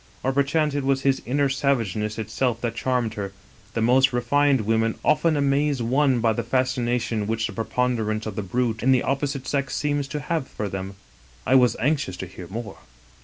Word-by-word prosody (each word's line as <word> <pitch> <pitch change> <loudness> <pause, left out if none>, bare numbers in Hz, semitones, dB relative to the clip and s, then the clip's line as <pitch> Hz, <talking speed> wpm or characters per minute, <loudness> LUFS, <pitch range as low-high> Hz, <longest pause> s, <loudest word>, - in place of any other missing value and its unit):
Or 130 - +1
perchance 145 +2 +1
it 145 -1 -1
was 135 0 +1
his 135 -1 +2
inner 140 +3 +2
savageness 115 -7 0
itself 115 +2 -1
that 120 -2 -1
charmed 125 -2 0
her; 100 -2 -5 0.4
the 115 - +1
most 130 +3 +4
re 120 - 0
fined 140 +1 +3
women 115 +1 +1
often 155 +1 +3
amaze 140 0 +1
one 130 +1 +2
by 110 -1 +3
the 115 - -1
fascination 120 -3 0
which 115 +1 -1
the 110 - -4
preponderance 110 -1 -1
of 110 -3 -5
the 105 - -2
brute 110 +3 -1
in 130 - +3
the 125 - +2
opposite 135 -1 -2
sex 140 -1 -1
seems 145 -2 -1
to 150 +2 -4
have 150 -1 -2
for 105 - -4
them. 95 0 -5 0.3
" 60 +1 -28
I - - +2
was 125 -3 +5
anxious 135 - 0
to 95 - -5
hear 90 0 -10
more. 105 +1 -7
125 Hz, 200 wpm, -24 LUFS, 110-140 Hz, 0.4 s, was